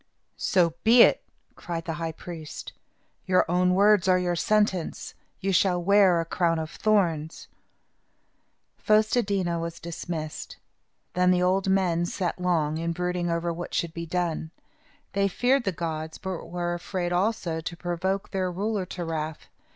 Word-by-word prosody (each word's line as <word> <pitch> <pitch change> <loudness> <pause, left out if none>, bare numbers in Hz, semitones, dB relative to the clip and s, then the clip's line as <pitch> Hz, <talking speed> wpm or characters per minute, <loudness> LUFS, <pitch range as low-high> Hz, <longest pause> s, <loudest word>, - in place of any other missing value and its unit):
"So 175 -4 +2
be 230 +2 +8
it," - - +4 0.3
cried 165 -1 -5
the 165 - -2
high 165 -1 -2
priest. 160 -2 -8 0.5
"Your 185 -1 +4
own 180 +1 +2
words 200 -1 +4
are 185 -1 +5
your 180 -1 0
sentence. 205 -1 0 0.3
You 195 0 0
shall 180 0 +3
wear 190 -1 +4
a 165 - -1
crown 165 0 +1
of 160 0 -4
thorns." 170 -7 0 1.3
Fos 215 0 +3
te 245 - +3
di' 200 -3 -1
na 170 -1 -1
was 170 0 -5
dismissed. 165 -2 -6 0.6
Then 180 0 +3
the 180 0 +3
old 190 +1 +2
men 175 -3 +2
sat 180 -1 -3
long, 160 -4 +1
in 170 0 -1
brooding 180 0 -2
over 170 0 -1
what 175 +1 -6
should 170 -1 -1
be 170 0 -6
done. 165 -2 -2 0.6
They 200 0 +2
feared 245 +6 +1
the 195 - +1
gods, 160 -2 -4
but 190 -2 -5
were 175 0 -2
afraid, 175 0 -3
also, 175 -4 0
to 170 +1 -6
provoke 185 +3 -2
their 185 -1 -1
ruler 200 +1 -2
to 175 -1 -5
wrath. 155 -1 -4
175 Hz, 160 wpm, -26 LUFS, 170-190 Hz, 1.3 s, be